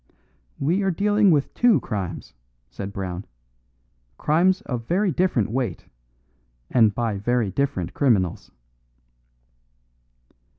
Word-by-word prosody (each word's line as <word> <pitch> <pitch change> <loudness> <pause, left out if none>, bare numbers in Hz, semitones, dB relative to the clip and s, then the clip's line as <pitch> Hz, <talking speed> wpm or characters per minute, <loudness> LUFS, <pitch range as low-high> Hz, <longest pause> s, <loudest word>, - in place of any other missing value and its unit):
"We 170 +8 +1
are 195 - +1
dealing 205 +3 +3
with 145 -5 +2
two 240 -2 +4
crimes," 95 -7 -5 0.4
said 100 +6 -6
Brown, 95 -2 -5 0.9
"crimes 180 +5 +2
of 120 -3 -5
very 190 +2 +1
different 145 - +1
weight 120 -7 -3 0.9
and 110 -4 +4
by 115 -4 -1
very 120 -1 0
different 95 -8 -2
criminals." 105 - +1
125 Hz, 100 wpm, -23 LUFS, -, 0.9 s, two